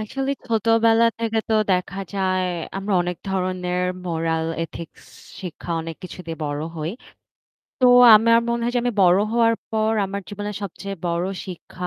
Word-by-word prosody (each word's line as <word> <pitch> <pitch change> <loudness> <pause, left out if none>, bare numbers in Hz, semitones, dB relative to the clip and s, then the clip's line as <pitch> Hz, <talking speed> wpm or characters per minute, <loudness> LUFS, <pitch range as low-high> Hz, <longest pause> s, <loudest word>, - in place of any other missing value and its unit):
আসলেই 270 +5 -3
ছোটবেলা 225 +1 +3
থেকে 225 -1 -1
তো 220 - +2 0.2
দেখা 185 +2 -1 0.2
যায় 185 -1 0 0.3
আমরা 195 +1 -3
অনেক 175 0 -3
ধরনের 180 -1 -1 0.3
moral 165 -1 -1 0.2
ethics 165 0 -8 0.4
শিক্ষা 175 -1 -8
অনেক 165 -1 -7
কিছু 185 - -9
দিয়ে 165 0 -5
বড় 145 +1 -3
হই। 155 +2 -3 0.9
তো 250 - +6 0.3
আমার 230 +2 +6
মনে 235 0 0
হয় 240 - 0
যে 245 - +2
আমি 245 - +1
বড় 180 +1 +5
হওয়ার 230 -1 +3 0.2
পর 220 -1 +1
আমার 195 +1 -4
জীবনের 205 0 -5
সবচেয়ে 195 +1 -6
বড় 170 +1 -1 0.2
শিক্ষা 180 0 -7
195 Hz, 155 wpm, -22 LUFS, 175-225 Hz, 0.9 s, তো